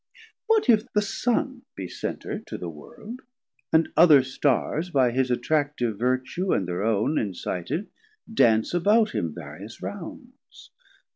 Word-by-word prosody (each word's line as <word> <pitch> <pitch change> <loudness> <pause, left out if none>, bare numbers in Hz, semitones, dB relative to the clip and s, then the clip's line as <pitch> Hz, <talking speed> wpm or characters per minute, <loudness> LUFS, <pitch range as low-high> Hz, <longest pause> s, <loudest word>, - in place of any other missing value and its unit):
What 445 -5 +3
if 230 0 +3
the 210 - +3
Sun 250 +5 -1
Be 95 -2 -5
Center - - -5
to - - -8
the 85 -2 -6
World, 210 - -11 0.5
and 160 0 +3
other 155 -5 +7
Starrs 140 +5 0
By 130 -6 +3
his 130 +1 0
attractive 125 -3 0
vertue 130 +9 0
and 95 - 0
thir 90 +1 -3
own 110 +7 +1
Incited, 100 - -3 0.5
dance 110 - +3
about 210 +5 +3
him 85 - -2
various 85 +7 -10
rounds? 245 - -10
140 Hz, 135 wpm, -25 LUFS, -, 0.5 s, other